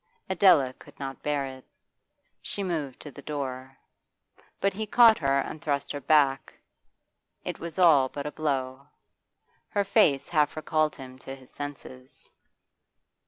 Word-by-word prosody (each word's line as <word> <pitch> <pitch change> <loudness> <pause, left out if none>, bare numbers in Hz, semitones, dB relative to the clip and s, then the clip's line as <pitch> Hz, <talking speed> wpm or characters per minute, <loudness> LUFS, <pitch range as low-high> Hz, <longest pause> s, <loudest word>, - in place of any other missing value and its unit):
Adela 175 -8 +4
could - - -16
not 135 -1 -6
bear 145 -2 -1
it; 130 -1 -9 0.8
she 200 - -3
moved 155 -8 -3
to 150 - -9
the 140 - -12
door. 135 -3 -6 0.8
But 195 - +1
he 215 +2 -4
caught 230 0 +6
her 140 -1 +2
and 155 - -7
thrust 140 -2 -2
her 145 - -5
back; 140 -1 +2 0.9
it - - -5
was 170 +1 -7
all 155 -8 +5
but 140 +1 -6
a 150 - -3
blow. 135 -3 -3 0.8
Her 205 - 0
face 175 - +3
half 150 -3 +1
recalled 155 0 0
him 130 -2 -11
to 135 +1 -8
his 130 -2 -18
senses. 135 -3 -10
145 Hz, 145 wpm, -27 LUFS, 135-160 Hz, 0.9 s, caught